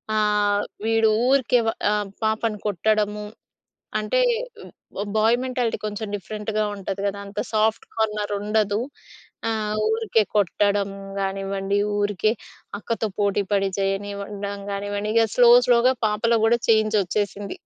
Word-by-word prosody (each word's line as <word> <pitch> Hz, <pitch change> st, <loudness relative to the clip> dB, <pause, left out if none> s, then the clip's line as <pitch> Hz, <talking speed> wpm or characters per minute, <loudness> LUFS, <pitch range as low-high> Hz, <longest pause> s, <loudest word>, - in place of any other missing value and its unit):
ఆహ్, 210 Hz, -1 st, +2 dB, 0.2 s
వీడు 225 Hz, -1 st, +3 dB, 0.2 s
ఊరికే 255 Hz, -2 st, +3 dB, 0.3 s
ఆహ్, 210 Hz, -1 st, 0 dB, 0.2 s
పాపను 220 Hz, 0 st, 0 dB
కొట్టడము, 210 Hz, +1 st, 0 dB, 0.8 s
అంటే 215 Hz, -, 0 dB, 1.0 s
బాయ్ 225 Hz, +3 st, +4 dB
మెంటాలిటీ 250 Hz, -3 st, -1 dB
కొంచెం 210 Hz, +1 st, -4 dB
డిఫరెంట్‌గా 215 Hz, +2 st, -3 dB
ఉంటది 195 Hz, 0 st, -5 dB
కదా! 200 Hz, 0 st, -1 dB
అంత 200 Hz, 0 st, -6 dB
సాఫ్ట్ 215 Hz, +1 st, +1 dB
కార్నర్ 210 Hz, -2 st, -1 dB
ఉండదు. 210 Hz, 0 st, +1 dB, 0.7 s
ఆ! -, -, +1 dB, 0.4 s
ఊరికే 445 Hz, -, +2 dB
కొట్టడము 200 Hz, 0 st, +1 dB, 0.2 s
కానివ్వండి, 195 Hz, +1 st, -1 dB, 0.2 s
ఊరికే 205 Hz, +1 st, +1 dB, 0.5 s
అక్కతో 225 Hz, -1 st, -2 dB
పోటీపడి 200 Hz, -1 st, +1 dB
చేయనివ్వడం 200 Hz, +1 st, -3 dB
కానివ్వండి. 205 Hz, +1 st, -3 dB
ఇక 230 Hz, -, +5 dB
స్లో, 245 Hz, -1 st, +7 dB, 0.2 s
స్లోగా 245 Hz, +1 st, +5 dB
పాపలో 225 Hz, +2 st, +1 dB
కూడా 235 Hz, +1 st, +3 dB
చేంజొచ్చేసింది. 205 Hz, -2 st, +1 dB
210 Hz, 110 wpm, -23 LUFS, 200-220 Hz, 1.0 s, స్లో